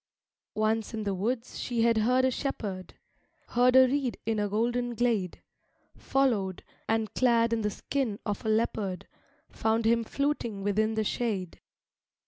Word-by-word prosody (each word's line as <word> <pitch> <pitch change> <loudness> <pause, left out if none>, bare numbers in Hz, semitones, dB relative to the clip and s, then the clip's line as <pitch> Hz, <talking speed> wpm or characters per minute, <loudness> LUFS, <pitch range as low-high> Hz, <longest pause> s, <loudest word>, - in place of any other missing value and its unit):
II - - 0
Once 220 +1 0
in 220 - -3
the 200 -1 -1
woods 230 +6 -3
she 235 -2 -1
had 230 -1 +3
heard 250 +4 +3
a 260 - +2
shepherd, 205 -9 -4 0.5
Heard 250 +1 +3
a 260 0 +8
reed 270 -2 -1
in 220 -1 0
a 205 0 0
golden 240 +3 0
glade; 225 -7 0 0.5
Followed, 215 -9 0 0.3
and 225 -1 0
clad 235 -2 +3
in 225 - 0
the 210 - 0
skin 230 +1 -2
of 205 -1 -3
a 220 - -1
leopard, 215 -4 -1 0.4
Found 225 0 0
him 230 +1 +3
fluting 235 -6 -2
within 215 +2 +1
the 220 - +1
shade. 205 -5 -2
225 Hz, 155 wpm, -28 LUFS, 210-245 Hz, 0.5 s, a